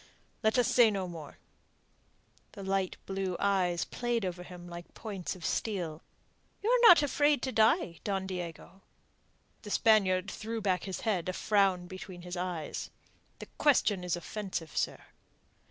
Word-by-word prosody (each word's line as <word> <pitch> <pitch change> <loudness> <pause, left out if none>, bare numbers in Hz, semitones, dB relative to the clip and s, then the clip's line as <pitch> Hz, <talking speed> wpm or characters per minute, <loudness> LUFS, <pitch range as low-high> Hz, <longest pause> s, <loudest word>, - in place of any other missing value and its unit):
"Let 220 +1 +2
us 245 - +4
say 240 -3 +6
no 195 -3 -2
more." 160 -4 -9 1.2
The 200 - -8
light 190 -1 -1
blue 190 -2 -2
eyes 185 -4 +1
played 240 -3 -2
over 180 -1 -4
him 180 -1 -10
like 175 0 -10
points 195 -6 -5
of 175 - -9
steel. 175 -7 -2 0.6
"You 445 - +2
are - - +6
not 340 -7 +9
afraid 290 -1 +2
to 260 - -1
die, 220 - +3
Don 195 -2 -1
Diego?" 180 0 -7 0.8
The 210 - -9
Spaniard 195 -4 +3
threw 225 +1 -4
back 190 -4 0
his 190 -2 -5
head, 190 -6 0
a - - -2
frown 195 -3 +2
between 185 -1 -9
his 180 0 -6
eyes. 175 -4 -4 0.5
"The - - -8
question 215 -10 +3
is 180 -1 0
offensive, 175 -3 -5
sir." - - -1
190 Hz, 155 wpm, -31 LUFS, 180-220 Hz, 1.2 s, not